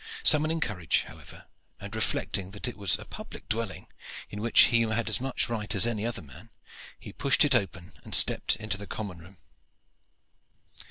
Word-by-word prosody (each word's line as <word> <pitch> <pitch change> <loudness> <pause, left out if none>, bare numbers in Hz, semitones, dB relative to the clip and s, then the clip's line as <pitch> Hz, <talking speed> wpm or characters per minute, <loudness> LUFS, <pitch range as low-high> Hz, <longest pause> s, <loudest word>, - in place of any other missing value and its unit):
Summoning 155 +1 +4
courage, 90 - 0
however, - - -13 0.3
and 100 +1 -8
reflecting 100 -3 -1
that 100 +5 -5
it 120 - -5
was 100 -3 +1
a - - -11
public - - -10
dwelling, 110 -7 -3 0.5
in 105 - -6
which 115 +1 +6
he 115 - +5
had 115 0 0
as 110 - -2
much 135 0 -1
right 110 -4 -3
as 95 - +4
any 115 -2 -1
other 120 - -4
man, 65 -3 -13 0.5
he - - -10
pushed 140 +2 +4
it 145 - +3
open 95 -5 -1
and - - 0
stepped - - +4
into 105 -2 -4
the 100 - -8
common 100 -5 -6
room. 90 +3 -15
110 Hz, 175 wpm, -28 LUFS, 95-115 Hz, 0.5 s, which